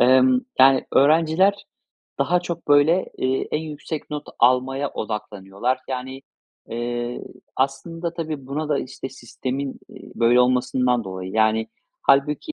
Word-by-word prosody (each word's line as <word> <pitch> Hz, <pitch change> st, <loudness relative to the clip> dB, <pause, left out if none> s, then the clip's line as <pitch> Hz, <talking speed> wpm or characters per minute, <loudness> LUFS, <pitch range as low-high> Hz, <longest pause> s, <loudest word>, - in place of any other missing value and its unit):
Emm, 130 Hz, 0 st, +5 dB, 0.2 s
yani, 135 Hz, 0 st, +6 dB
öğrenciler 165 Hz, +7 st, +3 dB, 0.5 s
,daha 180 Hz, 0 st, +2 dB
çok 170 Hz, -3 st, -6 dB
böyle, 145 Hz, +6 st, +5 dB
eee, 130 Hz, +1 st, -1 dB
en -, -, +2 dB
yüksek 155 Hz, 0 st, -6 dB
not 150 Hz, 0 st, -5 dB
almaya 130 Hz, +3 st, +2 dB
odaklanıyorlar. 105 Hz, +2 st, -3 dB
Yani, 130 Hz, +1 st, -5 dB, 0.5 s
eee, 120 Hz, +1 st, -3 dB, 0.3 s
aslında 165 Hz, +6 st, -2 dB
tabii, 155 Hz, -5 st, -5 dB
buna 150 Hz, +3 st, -3 dB
da, 145 Hz, -, +1 dB
işte, 130 Hz, 0 st, -6 dB
sistemin, 130 Hz, +2 st, -5 dB
eee, -, -, -13 dB
böyle 120 Hz, +1 st, +4 dB
olmasından 125 Hz, -1 st, +2 dB
dolayı. 95 Hz, 0 st, -6 dB
Yani 110 Hz, 0 st, +2 dB, 0.4 s
hâlbuki, 145 Hz, -, +2 dB
130 Hz, 125 wpm, -22 LUFS, 125-150 Hz, 0.5 s, yani